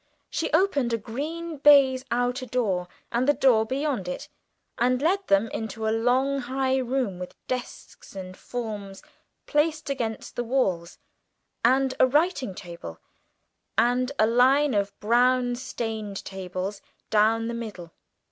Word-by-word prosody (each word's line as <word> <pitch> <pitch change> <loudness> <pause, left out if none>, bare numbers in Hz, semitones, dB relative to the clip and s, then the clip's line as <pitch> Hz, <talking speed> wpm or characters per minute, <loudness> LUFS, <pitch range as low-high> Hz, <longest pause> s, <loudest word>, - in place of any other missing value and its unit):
She 320 +2 -2
opened 295 -8 +2
a - - +2
green 310 +9 -5
baize 270 -2 +6
outer 245 +2 -1
door, 200 -8 0 0.2
and 240 +3 +1
the 290 - +4
door 225 -5 +4
beyond 265 -6 -1
it, 180 - -5 0.5
and 250 +1 +2
led 380 +7 +1
them 195 +3 +3
into 220 0 -4
a 220 - +2
long 260 +4 +2
high 260 +1 0
room, 250 -7 -1
with 180 - -7
desks 250 -5 -6
and 185 -1 -7
forms 210 -5 -6 0.4
placed 305 -1 0
against 230 -5 -4
the 240 - -1
walls, 195 -9 -1 0.7
and 260 +2 +3
a 255 - +6
writing 285 - +1
table, 170 - -9 0.8
and 250 +2 +2
line 255 +5 +4
of 200 -1 -1
brown 245 +2 +3
stained 220 -5 -5
tables 190 +1 -5 0.3
down 220 +2 +3
the 235 - -3
middle. 210 -8 -7
245 Hz, 135 wpm, -26 LUFS, 215-270 Hz, 0.8 s, baize